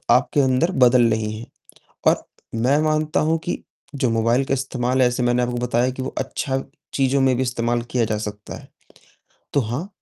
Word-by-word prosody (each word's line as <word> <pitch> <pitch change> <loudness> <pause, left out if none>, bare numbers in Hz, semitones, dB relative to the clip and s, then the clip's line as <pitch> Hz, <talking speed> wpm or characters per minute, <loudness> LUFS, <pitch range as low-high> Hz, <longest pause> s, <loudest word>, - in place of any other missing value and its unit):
आपके 140 +3 +2
अंदर 130 +7 +2
बदल 120 -1 +5
रही 110 -1 -1
हैं। 115 - -9 0.6
और - - +3 0.3
मैं 125 +6 +2
मानता 155 0 +1
हूँ 165 - +2
कि 175 - -3 0.3
जो 130 -3 +1
मोबाइल 115 +4 +2
का 135 - -1
इस्तेमाल 130 -1 0
है, 125 - +6
जैसे 125 0 -2
मैंने 120 0 +2
आपको 120 0 -2
बताया 125 +1 +1
कि 130 - -6
वो - - -4
अच्छा 135 -1 -2 0.3
चीज़ों 135 0 +2
में 130 -1 +3
भी 130 - -1
इस्तेमाल 120 -1 -1
किया 120 -2 +2
जा 110 -1 -1
सकता 105 -1 -6
है। - - -14 0.9
तो 140 - +3
हाँ, 125 - -3
125 Hz, 190 wpm, -22 LUFS, 120-135 Hz, 0.9 s, है